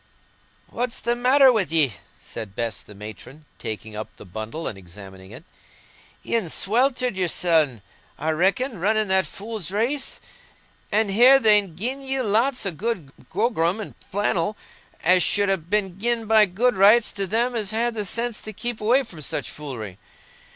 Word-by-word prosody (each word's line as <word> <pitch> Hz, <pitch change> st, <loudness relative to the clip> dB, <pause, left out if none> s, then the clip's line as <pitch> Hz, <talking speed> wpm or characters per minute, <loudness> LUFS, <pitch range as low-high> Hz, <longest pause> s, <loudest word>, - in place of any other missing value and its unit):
"What's 245 Hz, 0 st, -3 dB
the 240 Hz, -, 0 dB
matter 260 Hz, +2 st, +5 dB
wi' 210 Hz, -5 st, +2 dB
ye?" 155 Hz, -7 st, +3 dB, 0.2 s
said 100 Hz, -3 st, -8 dB
Bess 115 Hz, -2 st, -3 dB
the 105 Hz, -, -14 dB
matron, 110 Hz, -, -11 dB
taking 110 Hz, 0 st, -6 dB
up 110 Hz, +1 st, -6 dB
the -, -, -12 dB
bundle 110 Hz, -, -6 dB
and -, -, -4 dB
examining 95 Hz, 0 st, -12 dB
it. -, -, -12 dB, 0.8 s
"Ye'n 225 Hz, -7 st, -1 dB
sweltered 250 Hz, -, +1 dB
yoursen, 160 Hz, -, +1 dB, 0.3 s
I 155 Hz, +2 st, -1 dB
reckon, 195 Hz, -, 0 dB
running 215 Hz, +2 st, +1 dB
that 190 Hz, -3 st, +3 dB
fool's 210 Hz, -1 st, -6 dB
race. 235 Hz, +8 st, -2 dB, 0.7 s
An' 215 Hz, 0 st, +2 dB
here, 245 Hz, +7 st, +7 dB
they'n 210 Hz, -8 st, +5 dB
gi'en 250 Hz, +9 st, -3 dB
you 270 Hz, -1 st, -2 dB
lots 235 Hz, +4 st, +2 dB
o' 195 Hz, -, 0 dB
good 180 Hz, -5 st, -4 dB, 0.2 s
grogram 195 Hz, -3 st, 0 dB
and 215 Hz, -, -6 dB
flannel, 205 Hz, 0 st, -1 dB, 0.5 s
as 180 Hz, +2 st, +5 dB
should 200 Hz, +3 st, +1 dB
ha' 195 Hz, -3 st, 0 dB
been 195 Hz, -3 st, -1 dB
gi'en 235 Hz, +1 st, -1 dB
by 215 Hz, -1 st, +5 dB
good 235 Hz, +7 st, +1 dB
rights 210 Hz, +4 st, +5 dB
to 195 Hz, -2 st, -3 dB
them 235 Hz, +5 st, 0 dB
as 215 Hz, -4 st, -2 dB
had 230 Hz, +2 st, 0 dB
the 215 Hz, -2 st, -2 dB
sense 230 Hz, +3 st, -2 dB
to 215 Hz, -, -8 dB
keep 240 Hz, +2 st, -5 dB
away 245 Hz, +6 st, +3 dB
from 180 Hz, -10 st, -11 dB
such -, -, -3 dB
foolery. 115 Hz, -10 st, -7 dB
200 Hz, 165 wpm, -23 LUFS, 155-235 Hz, 0.8 s, here